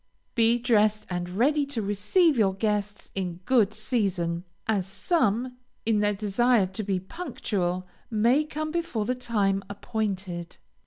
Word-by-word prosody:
Be 230 0 +4
dressed 215 -3 +2
and 175 0 -2
ready 275 +11 +2
to 280 -4 -3
receive 210 - +3
your 200 -5 +2
guests 205 0 -2
in 185 -3 -2
good 230 -6 +4
season, 195 -7 -1 0.2
as 200 -4 0
some, 250 - 0 0.3
in 220 -2 +3
their 205 0 +2
desire 215 +2 +3
to 190 +3 -5
be 195 -3 -1
punctual, 190 - -3 0.2
may 235 +7 +3
come 310 0 -4
before 330 -11 -1
the 250 - +1
time 210 -6 0
appointed. 195 -5 -4
210 Hz, 140 wpm, -27 LUFS, 195-245 Hz, 0.3 s, Be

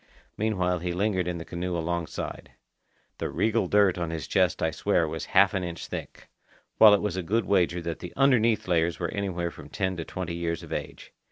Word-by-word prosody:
Meanwhile 90 -5 0
he 90 +1 -3
lingered 95 -1 0
in 90 -1 -2
the 85 - -7
canoe 90 0 -3
alongside. 85 0 -4 0.7
The - - -2
regal 110 -3 +1
dirt 100 -2 +3
on 85 -2 -2
his 80 -3 -4
chest - - +1
I - - +2
swear - - +1
was - - -4
half 100 +1 +6
an 95 -2 -1
inch 85 -1 -5
thick, - - -8 0.5
while 105 -2 +9
it 100 - -2
was 100 -3 -2
a - - 0
good 105 +5 0
wager 90 -3 +1
that 85 -1 -4
the 90 - -7
underneath 120 -7 +3
layers 85 -1 +1
were 85 -2 -2
anywhere 90 -4 -2
from 75 -2 -12
ten 95 0 -1
to 85 - -3
twenty 90 0 -5
years 85 -1 -3
of - - -7
age. - - -6
90 Hz, 205 wpm, -27 LUFS, 85-100 Hz, 0.7 s, while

